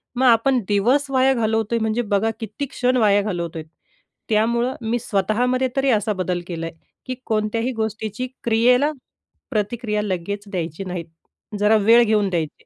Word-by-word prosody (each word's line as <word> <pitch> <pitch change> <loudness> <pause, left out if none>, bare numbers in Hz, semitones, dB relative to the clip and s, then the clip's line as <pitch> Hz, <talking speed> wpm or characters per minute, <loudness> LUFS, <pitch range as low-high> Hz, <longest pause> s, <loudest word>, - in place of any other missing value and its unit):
मग 260 - +1
आपण 245 +3 +4
दिवस 250 +8 +2
वाया 265 0 +4
घालवतोय, 225 -1 0
म्हणजे 220 +1 0
बघा 215 0 0
किती 225 +6 -4
क्षण 255 -1 0
वाया 205 -3 +4
घालवतोय. 170 -5 -4 0.7
त्यामुळे 235 +3 +2 0.2
मी 240 +1 +1
स्वतःमध्ये 245 +5 0
तरी 270 0 +2
असा 215 -1 +1
बदल 185 -2 -2
केलाय, 165 -2 -4 0.3
की 255 -1 -4
कोणत्याही 225 +3 -1
गोष्टीची 220 +2 -3 0.2
क्रियेला 245 +5 +3 0.6
प्रतिक्रिया 210 0 -1
लगेच 200 0 -3
द्यायची 170 -1 -4
नाही, 180 -2 -4 0.6
जरा 210 +1 +4
वेळ 230 +3 +6
घेऊन 210 -3 +2
द्यायची. 165 -4 -3
220 Hz, 140 wpm, -21 LUFS, 200-240 Hz, 0.7 s, वेळ